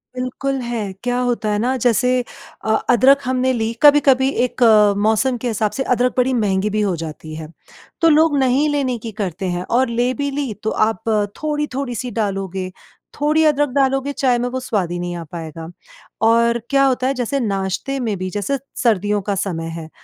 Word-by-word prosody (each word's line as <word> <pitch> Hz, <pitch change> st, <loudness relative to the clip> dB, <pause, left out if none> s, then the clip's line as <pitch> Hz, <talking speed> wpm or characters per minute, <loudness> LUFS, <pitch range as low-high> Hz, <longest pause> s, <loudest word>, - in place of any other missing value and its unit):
बिल्कुल 255 Hz, +2 st, -3 dB
है, 230 Hz, -5 st, -3 dB
क्या 245 Hz, 0 st, 0 dB
होता 240 Hz, -3 st, -1 dB
है 210 Hz, -, 0 dB
ना 250 Hz, +4 st, 0 dB
जैसे 245 Hz, +1 st, +3 dB, 0.6 s
अ, 220 Hz, -, +1 dB, 0.2 s
अदरक 260 Hz, +4 st, +6 dB
हमने 255 Hz, 0 st, +1 dB
ली 225 Hz, -2 st, -1 dB
कभी-कभी 275 Hz, -3 st, +5 dB, 0.2 s
एक 250 Hz, 0 st, -2 dB, 0.3 s
मौसम 220 Hz, +4 st, +1 dB
के 250 Hz, -, -2 dB
हिसाब 215 Hz, -2 st, 0 dB
से 265 Hz, -, -2 dB
अदरक 250 Hz, 0 st, +1 dB
बड़ी 255 Hz, +1 st, +2 dB
महँगी 205 Hz, -3 st, +1 dB
भी 215 Hz, +1 st, -1 dB
हो 195 Hz, -3 st, 0 dB
जाती 155 Hz, 0 st, -8 dB
है, 155 Hz, -1 st, -7 dB, 0.5 s
तो 330 Hz, -, +5 dB
लोग 310 Hz, -1 st, +4 dB
नहीं 265 Hz, +3 st, +2 dB
लेने 270 Hz, -4 st, 0 dB
की 225 Hz, 0 st, -7 dB
करते 190 Hz, 0 st, -3 dB
हैं 175 Hz, 0 st, -2 dB
और 260 Hz, 0 st, +2 dB
ले 240 Hz, +2 st, 0 dB
भी 285 Hz, +1 st, -2 dB
ली 275 Hz, -5 st, -3 dB
तो 220 Hz, -, 0 dB, 0.2 s
आप 225 Hz, -5 st, -4 dB, 0.4 s
थोड़ी-थोड़ी 285 Hz, -4 st, -2 dB
सी 245 Hz, +2 st, -4 dB
डालोगे, 195 Hz, -3 st, -3 dB, 0.5 s
थोड़ी 305 Hz, +2 st, +3 dB
अदरक 290 Hz, -1 st, +2 dB
डालोगे 270 Hz, 0 st, +1 dB
चाय 255 Hz, -3 st, +1 dB
में 245 Hz, +1 st, -1 dB
वो 260 Hz, -, -3 dB
स्वाद 205 Hz, -9 st, -2 dB
ही 175 Hz, -, -3 dB
नहीं 175 Hz, 0 st, -4 dB
आ 170 Hz, -, -6 dB
पाएगा। 165 Hz, -1 st, -7 dB, 0.6 s
और 235 Hz, 0 st, +3 dB
क्या 275 Hz, -1 st, +3 dB
होता 255 Hz, -1 st, +1 dB
है 270 Hz, -, +1 dB
जैसे 255 Hz, +2 st, -2 dB
नाश्ते 200 Hz, +5 st, -2 dB
में 225 Hz, -4 st, -1 dB
भी 185 Hz, 0 st, -4 dB
जैसे 205 Hz, +8 st, -2 dB, 0.3 s
सर्दियों 205 Hz, -3 st, +1 dB
का 200 Hz, +1 st, -2 dB
समय 170 Hz, -4 st, -3 dB
है 160 Hz, -, -9 dB
240 Hz, 190 wpm, -19 LUFS, 200-265 Hz, 0.6 s, अदरक